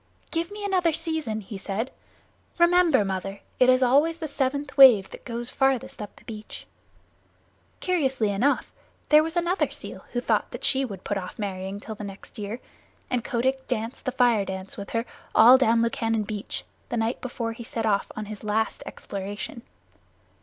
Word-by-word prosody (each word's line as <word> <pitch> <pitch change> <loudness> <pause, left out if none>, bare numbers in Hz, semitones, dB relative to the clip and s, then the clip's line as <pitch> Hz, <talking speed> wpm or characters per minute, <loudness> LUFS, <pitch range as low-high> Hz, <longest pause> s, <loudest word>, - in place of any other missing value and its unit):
"Give 335 0 -1
me 410 0 -6
another 365 -4 +2
season," 315 -9 -2
he 195 0 -8
said. 205 +6 -3 0.7
"Remember, 345 - +5
Mother, 195 +1 -4 0.2
it 255 - +6
is 255 0 +5
always 290 +6 +4
the 320 -2 -4
seventh 280 0 -2
wave 245 -8 +8
that - - -11
goes 240 0 -4
farthest 270 -5 0
up 205 - -8
the - - -18
beach." 215 -2 -9 1.2
Curiously 265 - +1
enough, 245 +9 +1 0.4
there 300 0 +8
was 325 +2 -3
another 345 +3 +1
seal - - -8
who 245 - +1
thought 225 -3 +1
that 245 - -8
she 275 -1 +3
would 200 -8 -6
put 205 - -1
off 185 - -8
marrying 195 -1 -4
till 220 - -7
the 210 - -8
next 200 +1 -9
year, 210 +3 -4 0.5
and 250 -2 0
Kotick 260 +3 -1
danced 230 -1 -3
the 255 - 0
Fire 240 -4 +3
dance 190 0 -6
with 200 - -7
her 230 0 -1 0.3
all 240 +3 +9
down 230 -2 +4
Lukannon 225 -1 0
Beach 210 0 -4 0.3
the 240 - -2
night 225 +2 -1
before 235 -2 -3
he 235 - -8
set 225 0 -3
off 200 -2 +1
on 215 - -4
his 215 0 -8
last 215 +1 0
exploration. 205 +4 -6
235 Hz, 175 wpm, -26 LUFS, 210-270 Hz, 1.2 s, all